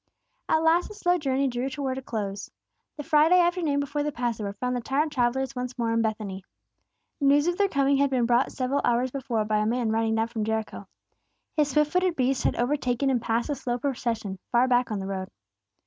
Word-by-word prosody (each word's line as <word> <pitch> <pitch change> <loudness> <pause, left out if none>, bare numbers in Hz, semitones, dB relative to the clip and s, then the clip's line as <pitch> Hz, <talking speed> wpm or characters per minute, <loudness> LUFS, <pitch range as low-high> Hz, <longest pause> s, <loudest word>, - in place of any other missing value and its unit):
At 315 0 +3
last 330 +2 +3
the 425 - -11
slow 355 -3 +1
journey 275 -2 0
drew 250 +1 -2
towards 265 -1 -3
a - - -9
close. 205 -5 -4 0.5
The 295 - -5
Friday 320 +4 +5
afternoon 345 -5 +1
before 285 +1 -2
the 295 0 -1
Passover 230 -5 -2
found 250 +4 -2
the 245 - -2
tired 290 +6 0
travellers 265 +1 0
once 250 0 -5
more 230 -2 0
in 230 - +2
Bethany. 210 -4 -3 0.8
News 285 +1 +4
of 350 0 +1
their 400 - +4
coming 275 -2 +2
had 280 0 +3
been 255 -3 +1
brought 240 +2 +2
several 265 +2 -1
hours 245 +2 +1
before 240 -5 -2
by 215 0 +1
a 210 - +1
man 235 -1 0
riding 225 0 +1
down 225 +1 0
from 225 -2 -3
Jericho. 220 0 -3 0.7
His 300 -2 +2
swift 300 +2 +2
footed 365 -1 +1
beast 260 -1 0
had - - +2
overtaken 255 0 0
and 245 -3 +1
passed 235 +3 -1
the - - +1
slow 245 -2 -3
procession 230 -7 -3
far 245 +1 +4
back 245 -1 +2
on 215 - -2
the 190 - -4
road. 190 -1 -4
255 Hz, 210 wpm, -26 LUFS, 230-285 Hz, 0.8 s, Friday